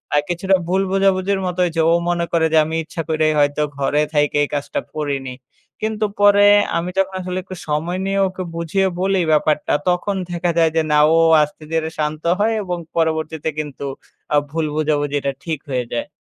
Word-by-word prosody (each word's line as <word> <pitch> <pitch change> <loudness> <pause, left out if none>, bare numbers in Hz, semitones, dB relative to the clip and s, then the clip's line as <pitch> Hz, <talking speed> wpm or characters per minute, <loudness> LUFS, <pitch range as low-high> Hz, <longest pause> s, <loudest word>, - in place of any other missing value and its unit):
আর 145 - +4
কিছুটা 190 +2 +2
ভুল 190 +2 +1
বোঝাবুঝির 195 0 +2
মতো 180 0 -4
হয়েছে। 165 -2 0
ও - - +5 0.2
মনে 170 -1 0
করে 165 -1 +2
যে - - +5
আমি 160 - -4
ইচ্ছা 165 +1 -5
করেই 155 -1 +2
হয়তো 145 +1 +2 0.2
ঘরে 145 +2 +1
থাইকা 145 0 +2
এই - - 0
কাজটা 145 -1 -2 0.2
করিনি। 140 -4 -3 0.5
কিন্তু 215 0 -1 0.2
পরে 205 0 +6 0.3
আমি 175 +2 -2
যখন 195 0 +1
আসলে 180 0 -4
একটু 185 0 -9
সময় 160 +4 -1
নিয়ে 195 0 0
ওকে 185 0 -6
বুঝিয়ে 180 +4 0
বলি 195 0 +1
ব্যাপারটা, 150 0 +2 0.2
তখন 180 +3 0 0.2
দেখা 175 0 0
যায় 165 -1 +4
যে 160 - +4
না 150 - +4 0.2
ও - - +4 0.3
আস্তে 150 +1 -7
ধীরে 160 -1 0
শান্ত 150 +1 -2 0.2
হয় 220 +2 +2
এবং 180 -2 -3 0.2
পরবর্তীতে 160 -1 -1
কিন্তু 145 -2 -5 0.5
আ - - +6
ভুল 160 -1 -1
বোঝাবুঝিটা 145 -2 0
ঠিক 160 -4 -3
হয়ে 125 -2 -1
যায়। 120 - -2
165 Hz, 185 wpm, -19 LUFS, 150-185 Hz, 0.5 s, পরে